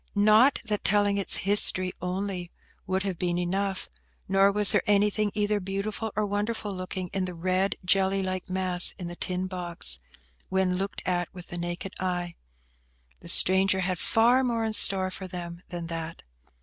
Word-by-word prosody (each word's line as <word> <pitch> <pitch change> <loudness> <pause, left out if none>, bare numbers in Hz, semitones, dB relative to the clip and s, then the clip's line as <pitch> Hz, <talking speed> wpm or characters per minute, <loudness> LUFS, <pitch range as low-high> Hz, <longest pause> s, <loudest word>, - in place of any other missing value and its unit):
Not 215 +6 +5
that 210 -2 -2
telling 205 0 +2
its 195 - +4
history 185 -2 +3
only 180 0 -3 0.4
would 190 +1 -1
have 190 -4 -4
been 175 -1 -1
enough; 190 +2 -2 0.4
nor 195 +1 +4
was 210 0 +4
there 210 -4 +3
anything 210 +1 +2
either 210 0 +1
beautiful 200 +3 -4
or 215 0 0
wonderful 205 +1 -3
looking 185 -1 -5
in 190 -1 -1
the 180 -1 -6
red, 185 +3 0
jelly 195 +1 +2
like 185 0 -4
mass 185 -1 +4
in 175 -2 -6
the 175 - -6
tin 180 +1 -3
box, 175 - -3 0.5
when 190 -1 0
looked 195 +1 -4
at 175 -1 -1
with 180 -1 -11
the 175 - -5
naked 175 +2 -5
eye. 175 -2 -2 0.9
The - - -12
stranger 190 0 +4
had 180 -1 -2
far 240 +4 +3
more 230 -3 -1
in 220 - -2
store 190 -3 +3
for 190 0 -7
them 175 -1 -7
than 175 -2 -6
that. 165 0 -6
190 Hz, 170 wpm, -26 LUFS, 180-205 Hz, 0.9 s, Not